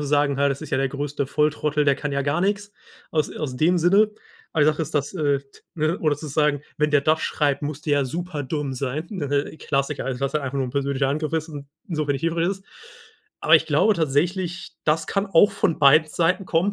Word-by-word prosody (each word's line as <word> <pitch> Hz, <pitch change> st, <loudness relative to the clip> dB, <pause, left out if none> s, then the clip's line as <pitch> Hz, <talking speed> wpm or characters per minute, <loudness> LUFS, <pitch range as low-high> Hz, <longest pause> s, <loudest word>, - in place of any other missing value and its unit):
sagen 145 Hz, -1 st, +1 dB
halt, 140 Hz, 0 st, +3 dB
das 140 Hz, -, -4 dB
ist -, -, -8 dB
ja -, -, +1 dB
der 135 Hz, 0 st, +1 dB
größte 140 Hz, +1 st, -3 dB
Volltrottel, 150 Hz, +1 st, +1 dB
der 140 Hz, -1 st, +4 dB
kann 145 Hz, -1 st, -4 dB
ja 140 Hz, 0 st, 0 dB
gar 145 Hz, +4 st, 0 dB
nix 205 Hz, +2 st, -1 dB, 0.4 s
aus 155 Hz, -2 st, 0 dB
aus 130 Hz, -5 st, -4 dB
dem 175 Hz, +5 st, +3 dB
Sinne. 195 Hz, +6 st, +4 dB, 0.4 s
Aber 155 Hz, -, +2 dB
die -, -, +4 dB
Sache 150 Hz, -, -5 dB
ist, 155 Hz, +1 st, -6 dB
dass, 145 Hz, +3 st, 0 dB
äh, 145 Hz, -5 st, +1 dB
t 140 Hz, 0 st, -22 dB
ne, 155 Hz, +2 st, 0 dB
oder 155 Hz, -2 st, +1 dB
sozusagen, 150 Hz, 0 st, 0 dB, 0.2 s
„Wenn 150 Hz, 0 st, +2 dB
der 145 Hz, -1 st, +4 dB
das 155 Hz, +2 st, +2 dB
schreibt, 145 Hz, -2 st, 0 dB
muss 150 Hz, 0 st, -4 dB
der 150 Hz, -, -1 dB
ja -, -, 0 dB
super 165 Hz, +1 st, -4 dB
dumm 140 Hz, 0 st, -3 dB
sein.“ 150 Hz, -, -4 dB
Äh, 145 Hz, +2 st, -1 dB
Klassiker, 140 Hz, 0 st, -2 dB
also 130 Hz, 0 st, -3 dB
was 140 Hz, 0 st, -1 dB
ja 150 Hz, -, 0 dB
einfach 140 Hz, 0 st, -4 dB
nur 130 Hz, -, 0 dB
ein 125 Hz, -, -6 dB
persönlicher 140 Hz, 0 st, 0 dB
Angriff 155 Hz, +3 st, -2 dB
ist 160 Hz, +1 st, -1 dB
und 145 Hz, -2 st, -8 dB, 0.2 s
so 155 Hz, -3 st, -1 dB
wenig 140 Hz, -2 st, 0 dB
hilfreich 165 Hz, +1 st, +1 dB
ist. 195 Hz, 0 st, -4 dB, 0.8 s
Aber -, -, +5 dB
ich -, -, -2 dB
glaube 220 Hz, -, +3 dB
tatsächlich, 170 Hz, +4 st, -1 dB
das 155 Hz, +1 st, +1 dB
kann 195 Hz, 0 st, -1 dB
auch 195 Hz, +2 st, +5 dB
von 195 Hz, -4 st, 0 dB
beiden 155 Hz, +2 st, +6 dB
Seiten 180 Hz, +4 st, +1 dB
kommen. 180 Hz, +5 st, +1 dB
150 Hz, 230 wpm, -23 LUFS, 140-165 Hz, 0.8 s, beiden